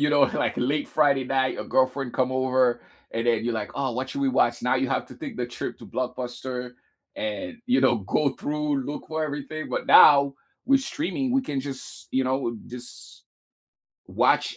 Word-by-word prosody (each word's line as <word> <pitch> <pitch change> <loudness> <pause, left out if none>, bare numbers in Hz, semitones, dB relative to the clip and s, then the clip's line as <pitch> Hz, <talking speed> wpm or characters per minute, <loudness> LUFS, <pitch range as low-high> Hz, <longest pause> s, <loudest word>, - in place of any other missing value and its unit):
you 150 - +3
know 145 -1 +3
like - - +1
late 145 +4 0
Friday 140 -3 +3
night, 130 0 +1
your - - -5
girlfriend 130 -1 +1
come 130 0 +1
over 130 -1 +2 0.3
and 115 +1 -2
then 115 -2 +2
you're 120 - 0
like, 110 -2 -4
"Oh, 135 -2 -1
what 130 +3 -3
should 280 - -4
we 275 - +2
watch?" 260 - +2
Now - - +2
you - - 0
have - - -1
to - - -13
take 275 -7 -7
the - - -1
trip 120 0 -6
to - - -11
Blockbuster 125 0 -4 0.5
and, 110 - -4
you 250 +2 +3
know, 120 - +4
go 125 +9 +1
through, 150 -2 -1
look 145 - -5
for 160 0 -2
everything, 155 +1 -5
but - - -3
now, 140 -2 +8 0.3
with 275 +2 +4
streaming, 275 -1 -2
we 265 +1 +3
can 140 - -3
just, 135 -1 -8
you 130 - +2
know, 130 +1 +1
w 120 -4 -3
just 125 0 -11 0.8
watch - - +2
135 Hz, 200 wpm, -25 LUFS, 125-150 Hz, 0.8 s, now